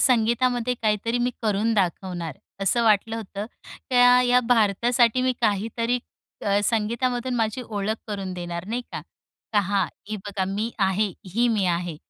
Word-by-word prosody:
संगीतामध्ये 245 0 +2
काहीतरी 220 +2 +1
मी 245 +1 +1
करून 215 +1 +1
दाखवणार 175 -4 -2 0.3
असं 235 +5 +2
वाटलं 220 +1 +3
होतं. 205 -1 -6 0.4
त्या 245 0 +6
या 250 0 +4
भारतासाठी 235 +2 +3
मी 255 0 +2
काहीतरी 230 +3 0 0.5
अ, 200 0 +3
संगीतामधून 240 +3 0
माझी 225 +2 -1
ओळख 210 0 -1
करून 195 -3 -4
देणार 175 -1 -5
नाही 240 +2 -1
का, - - -4 0.5
का 210 - +4
हां, 195 -1 +1 0.2
ही 215 - -3
बघा 195 -2 -2
मी 205 +4 -2
आहे, 195 +2 +2 0.3
ही 240 +1 +3
मी 215 -4 +1
आहे. 175 -2 -1
220 Hz, 150 wpm, -24 LUFS, 195-240 Hz, 0.5 s, त्या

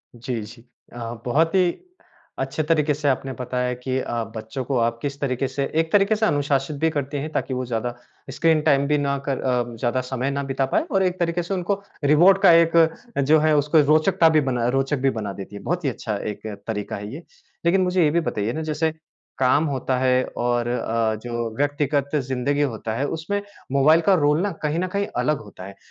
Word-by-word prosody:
जी, 120 0 -4
जी। 115 +3 -11 0.3
अ, 115 -1 -5
बहुत 160 +8 +2
ही 180 -2 +4 0.7
अच्छे 135 +4 -2
तरीके 150 -1 +2
से 145 0 -3
आपने 135 0 -1
बताया 125 0 -2
कि 130 +1 -3
अ, 120 -2 -2
बच्चों 110 +4 -5
को 135 0 -1
आप 115 0 +1
किस 140 -1 -4
तरीके 135 -1 -1
से 135 +1 -2 0.2
एक 160 - -6
तरीके 205 +1 +4
से 220 +1 +1
अनुशासित 145 -3 0
भी 160 +3 +2
करते 145 -2 -3
हैं, 155 +3 -5
ताकि 135 - -2
वो 130 0 -2
ज़्यादा 120 0 -3 0.4
स्क्रीन 160 -2 +2
टाइम 140 -2 +3
भी 150 - +2
ना 140 -1 0
कर 135 -2 -1
अ, 120 -2 -1
ज़्यादा 125 +2 0
समय 130 +2 -2
ना 140 0 -2
बिता 135 0 -1
पाएँ - - +3
और 195 -4 +2
एक 185 0 -1
तरीके 170 0 0
से 185 - -4
उनको 195 +2 -1 0.2
रिवॉर्ड 170 +7 +6
का 175 - +9
एक 165 0 +4 0.4
जो 150 +3 +4
है, 155 0 +3
उसको 150 +2 +3
रोचकता 165 +1 +4
भी 155 -1 +4
बनाए 120 -1 0
रोचक 135 +2 0
भी 135 - +2
बना 105 -5 -4
देती 100 +1 -9
है। - - -8
बहुत 175 +6 -2
ही - - +3
अच्छा 110 -4 -4
एक 105 +1 -7 0.2
तरीका 105 -2 -3
है 105 +3 -7
ये। 160 +5 -8 0.4
लेकिन 185 +3 +4
मुझे 180 -1 +2
ये 150 - +4
भी 170 - +2
बताइए 110 -7 -2
ना, 160 - -3
जैसे 155 0 -1 0.4
काम 135 +4 +3
होता 135 -3 -1
है 130 0 +3
और 120 0 0
अ, 115 -2 0
जो 120 -1 -3
व्यक्तिगत 145 0 0
ज़िंदगी 135 +1 0
होता 115 -5 -2
है, 140 +5 -1
उसमें 170 +7 -3 0.3
मोबाइल 150 +4 +5
का 195 +4 +4
रोल 150 +3 +3
ना 205 +1 0
कहीं 150 +2 0
न 185 - 0
कहीं 200 +2 -2
अलग 150 -1 +1
होता 90 - -12
है, 100 0 -10
140 Hz, 215 wpm, -23 LUFS, 125-160 Hz, 0.7 s, का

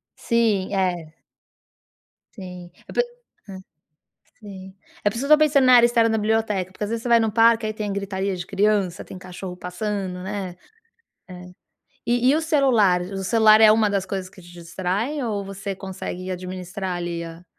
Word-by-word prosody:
Sim, 215 -5 0
é. 175 -4 -2 1.2
Sim, 180 -3 -10 0.2
eu - - -10
pe 485 - +3 0.5
hã, 190 -1 -8 0.8
sim. 190 -2 -11 0.3
É 205 - +3
por 205 - -8
isso 235 - -3
que 300 - -2
eu - - +11
estou - - -5
pensando 290 -3 +3
na 255 - +6
área 235 -1 +7
externa 230 -1 +3
da 220 - +1
biblioteca, 210 -3 0
porque 200 - -7
às 205 - -3
vezes 230 0 -3
você 245 - -3
vai 235 -1 +6
no 220 -1 0
parque, 230 0 +4
aí 215 - -2
tem 210 -1 -4
gritaria 195 -1 -3
de 180 0 -6
criança, 200 -2 0
tem 185 - -10
cachorro 180 0 -8
passando, 185 0 -4
né. 190 -2 -5 0.7
É. 180 0 -10 0.6
E 245 +1 +2
e 290 - +4
o 320 - 0
celular, 245 - +3
o 195 +1 -5
celular 220 +1 +5
é 215 -1 +8
uma 220 -1 +3
das 195 -1 -1
coisas 190 -1 -5
que 185 - -16
te 175 0 -15
distrai, 190 - -3
ou 205 -4 -2
você 195 0 -6
consegue 185 -1 -7
administrar 185 0 -5
ali 170 -1 -4
a 165 +1 -10
195 Hz, 190 wpm, -23 LUFS, 185-225 Hz, 1.2 s, eu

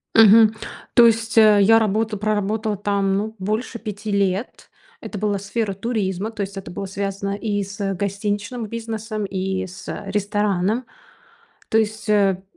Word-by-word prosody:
Мгм. 220 0 +7 0.4
То 240 - +7
есть, 230 0 +2
э, 215 -2 +7
я 225 +3 +6
работа 220 0 +1
проработала 215 0 -1
там, 200 -1 0
ну, 220 +2 -3
больше 215 +5 -3
5 210 -1 -5
лет. 200 +2 -1 0.3
Это 210 - -7
была 205 -1 0
сфера 200 +1 -2
туризма. 205 -1 -2
То 215 -2 -6
есть 195 0 -4
это 195 - -7
было 195 - -5
связано 200 +1 -3
и 205 -2 -2
с 200 0 -3
гостиничным 205 +4 -3
бизнесом, 220 -1 -4
и 190 -1 -2
с 185 - -11 0.2
ресторанным. 205 +2 0 0.8
То 220 - +3
есть, 215 -1 -2
э, 195 -3 +3
205 Hz, 150 wpm, -22 LUFS, 195-220 Hz, 0.8 s, Мгм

